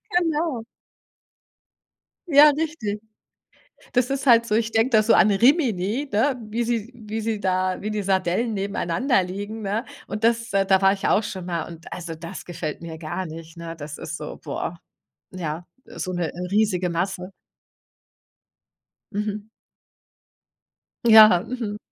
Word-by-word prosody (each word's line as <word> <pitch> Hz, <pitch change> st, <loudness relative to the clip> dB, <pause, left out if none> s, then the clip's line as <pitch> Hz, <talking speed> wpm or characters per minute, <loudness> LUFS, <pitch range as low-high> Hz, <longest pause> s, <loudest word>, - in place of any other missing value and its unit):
Genau. 320 Hz, -7 st, +1 dB, 1.7 s
Ja, 295 Hz, +1 st, +8 dB
richtig! 285 Hz, -9 st, -2 dB, 0.9 s
Das 250 Hz, -1 st, +2 dB
ist 275 Hz, 0 st, -2 dB
halt 235 Hz, -1 st, +6 dB
so. 210 Hz, -, 0 dB
Ich 225 Hz, 0 st, +1 dB
denke 225 Hz, +2 st, +3 dB
da 220 Hz, -2 st, +5 dB
so 225 Hz, -, +3 dB
an 210 Hz, -, +6 dB
Rimini, 235 Hz, -, +2 dB
ne, 250 Hz, +6 st, +2 dB
wie 235 Hz, +3 st, -1 dB
sie 235 Hz, 0 st, -2 dB
wie 220 Hz, -1 st, -5 dB
sie 220 Hz, -1 st, -2 dB
da 185 Hz, -1 st, 0 dB
wie 215 Hz, -, -2 dB
die 210 Hz, -1 st, -2 dB
Sardellen 190 Hz, +4 st, 0 dB
nebeneinander 200 Hz, +4 st, 0 dB
liegen, 205 Hz, +4 st, -5 dB
ne? 215 Hz, +4 st, -2 dB, 0.2 s
Und 215 Hz, +1 st, -5 dB
das 230 Hz, 0 st, +2 dB
da 195 Hz, -1 st, +3 dB
war 195 Hz, 0 st, +5 dB
ich 195 Hz, -, -3 dB
auch 215 Hz, -, +3 dB
schon 190 Hz, -4 st, -6 dB
mal 170 Hz, -3 st, -3 dB
und 165 Hz, 0 st, -12 dB
also 170 Hz, -2 st, -5 dB
das 165 Hz, +1 st, -8 dB
gefällt 165 Hz, -3 st, -5 dB
mir 165 Hz, -1 st, -7 dB
gar 175 Hz, +3 st, -4 dB
nicht, 165 Hz, +1 st, -10 dB
ne? 165 Hz, 0 st, -6 dB
Das 145 Hz, -1 st, -8 dB
ist 170 Hz, -, -5 dB
so, 150 Hz, -1 st, -7 dB
boah, 170 Hz, -, -4 dB, 0.5 s
ja, 170 Hz, -2 st, -5 dB, 0.2 s
so 185 Hz, -, -5 dB
'n -, -, -3 dB
'ne 170 Hz, -3 st, -1 dB, 0.2 s
riesige 190 Hz, -4 st, +1 dB
Masse. 180 Hz, +2 st, -3 dB, 1.8 s
Mhm. 210 Hz, 0 st, -3 dB, 1.6 s
Ja. 215 Hz, -5 st, +8 dB
Mhm. 230 Hz, -5 st, -4 dB
205 Hz, 150 wpm, -23 LUFS, 180-230 Hz, 1.8 s, Ja